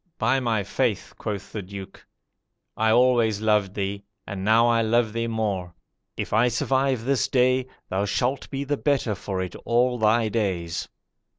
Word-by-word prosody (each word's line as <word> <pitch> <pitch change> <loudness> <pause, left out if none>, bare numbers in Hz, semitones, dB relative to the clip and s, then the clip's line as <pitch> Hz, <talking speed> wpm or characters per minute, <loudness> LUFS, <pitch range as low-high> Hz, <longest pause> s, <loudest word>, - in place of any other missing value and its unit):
"'By 130 +5 +2
my 115 -5 0
faith,' - - -1
quoth 105 -3 -5
the 105 - -4
Duke, 95 0 -10 0.7
'I 110 0 +2
always 120 -3 +4
loved 105 -3 +1
thee, 100 0 -3 0.2
and 95 -2 -5
now 110 +3 +5
I 115 -1 +3
love 115 0 +1
thee 115 0 -1
more; 100 -6 -2 0.4
if - - -4
I 115 +3 +4
survive 130 0 0
this 135 -1 +1
day, 130 0 +2 0.2
thou 95 +2 -1
shalt 125 +6 -1
be 135 0 -3
the 145 +1 -1
better 135 -7 +1
for 95 -1 -3
it 90 - -7
all 125 +1 +2
thy 110 +1 +3
days.' 95 -7 -2
110 Hz, 165 wpm, -25 LUFS, 100-125 Hz, 0.7 s, now